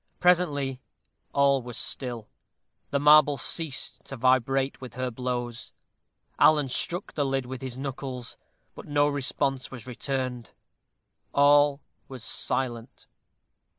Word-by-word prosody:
Presently 145 -7 +2 0.5
all 140 -1 +3
was 120 -1 -6
still; 120 -5 -1 0.6
the 140 - 0
marble 150 0 +6
ceased 160 -3 -4
to 135 - -8
vibrate 130 +2 +2
with 130 -2 -9
her 130 0 -2
blows. 120 -1 -4 0.7
Alan 150 -3 +5
struck 175 +7 -2
the 145 - 0
lid 135 -1 -1
with 130 0 -7
his 130 -2 -5
knuckles, 130 -3 -5 0.4
but - - -11
no 145 0 +3
response 135 -2 -1
was 125 -4 -9
returned. 125 -1 -4 0.8
All 145 0 +5 0.3
was 130 -4 -9
silent. 120 0 -2
135 Hz, 115 wpm, -27 LUFS, 125-145 Hz, 0.8 s, marble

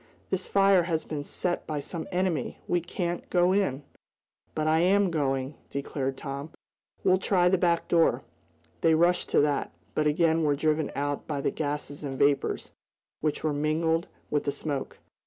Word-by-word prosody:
This 190 0 -1
fire 195 -2 +5
has 165 -2 -1
been 150 -2 -4
set 175 +4 -3
by 150 -2 -2
some 160 +3 -5
enemy! 180 -3 -1
We 175 - +1
can't 175 0 -3
go 180 +1 +3
in!" 150 -9 0 0.7
"But 155 - 0
I 155 +1 +3
am 190 +2 +3
going!" 135 -3 0 0.2
declared 135 -1 -3
Tom. 140 +1 -5 0.5
"We'll 185 0 +4
try 180 -2 +3
the 190 0 +2
back 170 -2 +2
door." 165 -1 +3 0.6
They 160 -1 +5
rushed 175 +2 +2
to - - +4
that, 145 -1 0 0.2
but 150 - +1
again 160 +1 +3
were 145 -2 +3
driven 155 +1 0
out 145 0 -2
by 145 -3 -2
the - - 0
gases 145 -1 -4
and 135 -2 -4
vapors, 140 +1 +1 0.5
which 155 -1 -1
were 155 -2 +1
mingled 160 +3 +1 0.2
with 145 - 0
the 140 - +1
smoke. 140 -2 -4
155 Hz, 170 wpm, -28 LUFS, 145-175 Hz, 0.7 s, fire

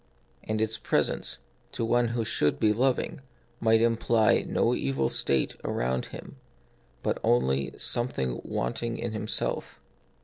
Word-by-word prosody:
And 110 0 -2
its 110 0 0
presence, - - 0 0.4
to 115 - -1
one 120 +1 +3
who 115 -1 -1
should 75 -8 +1
be 105 -1 +4
loving, 130 +3 0 0.4
might 110 0 +4
imply 115 -2 +3
no - - +2
evil 65 0 0
state 70 -1 +1
around 65 +1 -1
him, - - -10 0.7
but - - 0
only 65 +3 +1
something 65 - 0
wanting 115 0 -2
in 120 - -3
himself. 110 0 -2
110 Hz, 130 wpm, -28 LUFS, -, 0.7 s, be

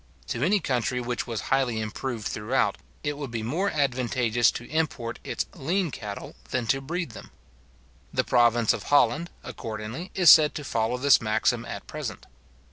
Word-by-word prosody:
To 120 - -2
any 200 +6 +3
country 125 - -1
which 120 0 -3
was 115 -3 -3
highly 130 -4 +1
improved 110 +1 -4
throughout, 115 +6 0 0.3
it 145 -1 -2
would 140 -3 -4
be 115 -2 -4
more 170 - 0
advantageous 125 -4 +2
to 120 - -7
import 145 -7 -2
its - - -2
lean 175 +2 -1
cattle 105 -4 -7 0.2
than 125 -2 -1
to 135 - -4
breed 165 +1 -3
them. - - -11 0.8
The - - +1
province 120 -2 +4
of - - -4
Holland, 150 +3 +3
accordingly, 110 - -6
is 180 -4 +8
said 155 -2 +7
to 150 - -4
follow 115 -2 0
this 140 +1 +5
maxim 115 +2 +1
at - - -7
present. - - -6
125 Hz, 165 wpm, -26 LUFS, 115-150 Hz, 0.8 s, is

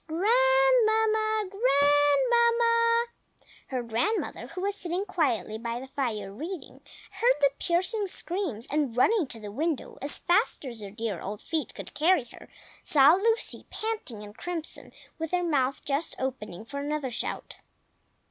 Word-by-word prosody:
Grandmamma!! 440 +2 +3
GrandMAMMA!!!" 465 - +3 0.6
Her 255 -2 -3
grandmother, 235 - -1
who 365 - -7
was 400 +1 0
sitting 360 0 -3
quietly 240 - -1
by 235 +1 -3
the 265 +1 -10
fire, 215 -8 -3
reading, 330 - -7 0.3
heard - - +3
the 280 -1 +4
piercing 380 +4 0
screams, 345 - -2
and 285 -5 0
running 375 - +3
to 230 - -5
the 210 -1 -8
window 310 +5 -3
as 285 +2 0
fast 355 -3 +1
as 235 -4 -6
her 200 - -6
dear 215 -4 -4
old 205 +2 -5
feet 320 -2 -3
could - - -8
carry 325 -3 +3
her, - - -14 0.3
saw 285 +1 +6
Lucy, 445 +5 0
panting 430 - -4
and 205 0 -11
crimson, 345 -3 -5 0.3
with 325 0 -3
her 355 0 +2
mouth 275 -5 0
just 285 +3 -2
opening 220 -7 -5
for 280 +5 -6
another 290 -2 -2
shout. 235 - -5
315 Hz, 145 wpm, -28 LUFS, -, 0.6 s, saw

